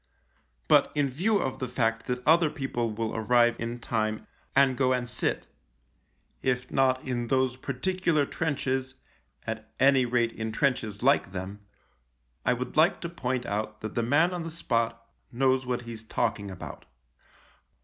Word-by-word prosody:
But, - - +5
in 145 -2 +1
view 200 +11 +2
of 135 -9 -2
the 130 - -2
fact 115 -2 -1
that 125 0 -3
other 165 +1 +5
people 120 -5 -2
will 110 +1 -3
arrive 120 +1 +3
in 115 +1 -3
time 110 -2 -2 0.3
and 135 -1 +5
go 130 0 +2
and 125 -1 -1
sit 120 0 -1 0.5
— - - -43 0.2
if 125 -1 -1
not 130 -1 +2
in 120 -2 -2
those 130 0 +1
particular 150 +4 0
trenches, 130 -4 -2 0.5
at 110 -1 -5
any 135 -1 +5
rate 120 -1 +1
in 110 0 -4
trenches 115 -5 -1
like 135 -8 +3
them 95 +2 -5 0.4
— - - -44
I - - +5
would 125 +1 -5
like 160 +4 +4
to 170 - -4
point 130 -6 -2
out 110 +1 -3
that 110 -1 -5
the 120 - 0
man 150 +9 +3
on 175 - -3
the 165 - -5
spot 115 -7 -1 0.3
knows 130 +1 +2
what 125 -1 -1
he's 115 -2 -8
talking 100 -2 -1
about. 95 - -9
125 Hz, 165 wpm, -28 LUFS, 115-135 Hz, 0.5 s, But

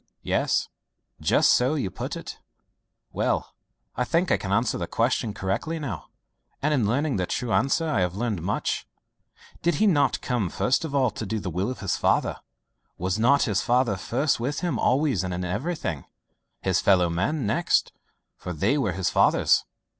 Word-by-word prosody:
"Yes, - - +1 0.5
just - - +4
so 130 +5 +2
you 105 -11 -2
put - - -5
it. - - -8 0.7
Well, - - -1 0.4
I 125 - 0
think 170 +8 +1
I - - +4
can 95 - -5
answer 115 +4 +1
the 85 - -3
question 115 -1 0
correctly 100 +12 -2
now, 115 - -5 0.5
and 150 +2 +1
in 120 -8 +2
learning 135 +3 0
the 90 -1 -1
true 120 -3 -2
answer 150 +5 +2
I 150 -10 +1
have 90 0 0
learned 105 -4 -2
much. 100 +5 -2 0.7
Did 170 -2 +1
he 215 - +2
not 145 - +3
come 120 -8 -1
first 125 - +1
of 150 -3 -4
all 130 -4 +3
to 110 - -5
do 110 +3 -2
the 95 -3 -4
will 90 +6 -1
of 130 - -6
his 100 -4 -1
Father? - - +1 0.6
Was 95 +3 -1
not 140 +5 +4
his 100 -5 +1
Father 120 -3 +2
first 125 - 0
with 140 +5 -2
him 170 -10 -1
always 130 - +2
and 90 -1 -3
in 90 +1 -3
everything 105 - -3 0.6
his 95 -1 +2
fellow 90 -3 +4
men 95 - -1
next 105 - +1 0.5
for 90 - -6
they 100 - +1
were 105 -9 0
his 95 0 -1
Father's?" - - +3
115 Hz, 180 wpm, -25 LUFS, 95-140 Hz, 0.7 s, just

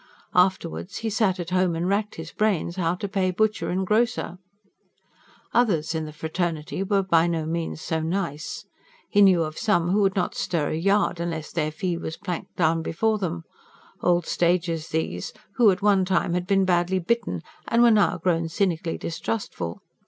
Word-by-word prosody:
Afterwards 180 0 +1
he 220 - 0
sat 200 -3 +1
at 175 0 -5
home 185 -2 +2
and 170 +2 -1
racked 205 +2 0
his 160 0 -7
brains 195 -5 0
how 175 -2 0
to 200 - -4
pay 190 -2 0
butcher 215 +3 0
and 190 +1 0
grocer. 215 -3 0 1.1
Others 170 -10 +2
of 160 -1 -2
the 155 - -7
fraternity 160 +1 -3
were 195 0 +1
by 170 -2 +3
no 165 -2 -1
means 165 0 -3
so 160 - -1
nice. 160 -2 -3 0.5
He 205 - +4
knew 185 -4 +6
of 155 0 -5
some 180 -6 +2
who 205 +2 +3
would 195 0 +2
not 185 - 0
stir 160 -5 -1
a - - -1
yard 195 +1 +1
unless 165 -3 -4
their 155 -2 0
fee 170 +3 -2
was 160 - -5
planked 180 -4 -5
down 165 -1 +2
before 215 +7 0
them 170 -3 -3 0.6
old 175 -1 +2
stagers 170 -2 0
these, 120 - -3 0.2
who 235 -4 +6
at 190 +1 0
one 200 -2 +4
time 185 -2 +1
had 180 0 -1
been 195 0 +3
badly 180 +1 +2
bitten 235 +7 -1 0.2
and 235 +1 +4
were 240 - +7
now 210 -3 +3
grown 170 -2 0
cynically 170 -2 -1
distrustful. 165 - -4
180 Hz, 180 wpm, -25 LUFS, 165-195 Hz, 1.1 s, were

